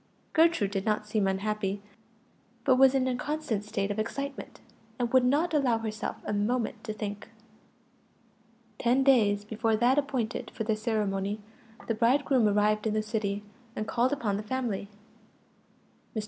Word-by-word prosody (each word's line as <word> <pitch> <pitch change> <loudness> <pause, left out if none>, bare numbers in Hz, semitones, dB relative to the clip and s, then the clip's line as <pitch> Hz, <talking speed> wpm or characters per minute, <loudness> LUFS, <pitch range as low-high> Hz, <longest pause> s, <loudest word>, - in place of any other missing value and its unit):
Gertrude 320 - +3
did 195 -1 -1
not 215 0 0
seem 210 -2 0
unhappy, 200 +1 -1 0.9
but 260 -2 +5
was 265 0 +6
in 260 -1 +2
a 255 - 0
constant 295 -6 -2
state 205 -1 -2
of 205 - -3
excitement, 275 +5 -4 0.4
and 245 0 -2
would 260 -1 +6
not 295 +7 +2
allow 265 -6 +3
herself 220 -1 -4
a - - -2
moment 220 +1 -1
to 220 - -3
think. 210 0 -6 1.5
Ten 250 +2 +3
days 210 -7 +4
before 220 +1 0
that 245 +5 +3
appointed 255 -5 -2
for 225 - -2
the 220 0 +1
ceremony, 210 -2 -1 0.5
the 230 - 0
bridegroom 250 +1 +3
arrived 210 +1 +2
in 215 - 0
the 215 - +1
city, 210 -2 -2 0.3
and 215 - -3
called 250 +2 +1
upon 220 -8 -1
the - - -3
family. 220 -3 -3 1.3
Mr. - - 0
220 Hz, 155 wpm, -29 LUFS, 210-255 Hz, 1.5 s, was